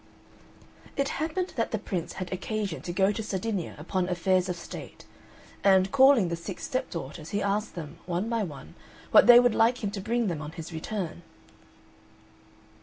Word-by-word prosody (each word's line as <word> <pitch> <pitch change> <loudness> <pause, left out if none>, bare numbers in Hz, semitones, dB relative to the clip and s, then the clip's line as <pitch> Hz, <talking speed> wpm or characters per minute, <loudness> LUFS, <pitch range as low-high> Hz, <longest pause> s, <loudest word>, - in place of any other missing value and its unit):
It 275 0 +1
happened 360 +4 -2
that 230 - +1
the 220 - -1
Prince 185 -5 -4
had 185 -1 -5
occasion 200 -1 -3
to 175 - -5
go 190 +3 +3
to 215 - -3
Sardinia 200 -3 -3
upon 180 +4 -2
affairs 185 +1 +1
of 180 - -1
state, 170 - -9 0.6
and, 190 -1 +5
calling 265 -8 +6
the 170 - -1
six 170 +3 -7
stepdaughters, 160 - -4
he 205 0 -1
asked 205 +2 -1
them, 160 -2 -7
one 180 +4 -1
by 230 -1 0
one, 150 -9 -7 0.4
what - - +7
they 240 0 +11
would 245 -2 +4
like 230 +2 +2
him 200 - -1
to 200 -2 -5
bring 235 +3 0
them 170 -6 -2
on 150 +1 -7
his 165 -1 -8
return. 170 0 -4
190 Hz, 175 wpm, -28 LUFS, 175-225 Hz, 0.6 s, they